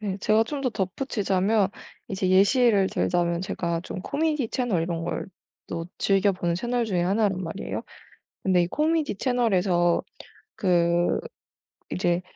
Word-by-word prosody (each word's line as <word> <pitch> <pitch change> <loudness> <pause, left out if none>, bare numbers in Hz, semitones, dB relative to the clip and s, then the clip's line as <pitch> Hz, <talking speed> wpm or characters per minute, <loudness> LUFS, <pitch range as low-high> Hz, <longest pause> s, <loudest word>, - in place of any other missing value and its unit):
네. 200 -3 -3
제가 215 +3 +3
좀 285 +4 -4
더 270 - +1
덧붙이자면 200 -1 0 0.4
이제 190 -1 -1
예시를 200 +1 +4
들자면 170 -1 0
제가 170 -2 -2
좀 185 - -6
코미디 295 +1 -1
채널 235 -11 0
이런 165 -1 -3
걸 175 - -3 0.4
또 165 0 -4
즐겨 195 0 +3
보는 175 -3 -1
채널 240 +3 -1
중의 185 -6 0
1 205 +4 +2
란 190 -2 -2
말이에요. 175 +4 -4 0.6
근데 185 -2 +3
이 - - -1
코미디 310 - 0
채널에서 190 -9 +2 0.6
그 175 -2 +2 0.7
이제 175 -1 +1
190 Hz, 270 characters per minute, -25 LUFS, 175-225 Hz, 0.7 s, 예시를